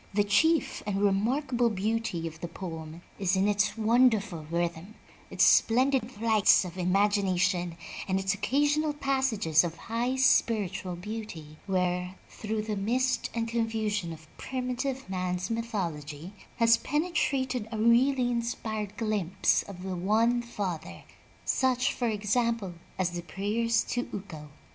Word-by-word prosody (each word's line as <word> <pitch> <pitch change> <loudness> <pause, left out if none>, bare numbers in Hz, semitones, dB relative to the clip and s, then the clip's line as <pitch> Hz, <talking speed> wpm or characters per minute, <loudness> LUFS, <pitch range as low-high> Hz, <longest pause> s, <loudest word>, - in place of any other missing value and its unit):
The 205 - +4
chief 275 +10 +2
and 195 -1 -1
remarkable 235 +5 +1
beauty 215 -4 -2
of 160 -1 -6
the 175 - -4
poem 165 -1 -8 0.2
is 190 -1 +1
in 190 +2 +2
its 205 +2 +1
wonderful 220 -7 +2
rhythm, 170 +4 -3 0.3
its - - +2
splendid 255 0 +4
flights 220 -4 +4
of 175 -1 -8
imagination 185 -2 +1 0.3
and 190 0 +1
its 195 0 0
occasional 290 +8 +1
passages 265 - +2
of 170 -1 -3
high 240 +3 -2
spiritual 205 -8 +2
beauty, 175 -6 -7
where, 180 -1 -1
through 215 0 -3
the 215 -1 -3
mist 250 +6 0
and 230 -1 -1
confusion 220 -5 -1
of 160 -1 -10
primitive 260 0 -3
man's 185 +1 -2
myth 230 +1 -3
ology, 160 -1 -4 0.2
has 230 0 +5
penetrated 275 -6 -1
a 220 - -3
really 245 +3 +3
inspired 220 -3 -3
glimpse 205 -5 +1
of 185 -2 -10
the 190 -1 -3
One 220 +7 +2
Father, 200 -8 -5 0.4
such, 255 -1 +1
for 245 - -1
example, 220 -1 0 0.2
as 180 -2 0
the 175 0 -4
prayers 210 +7 0
to 245 0 -2
Ukko. 160 -7 -8
210 Hz, 135 wpm, -28 LUFS, 185-235 Hz, 0.4 s, has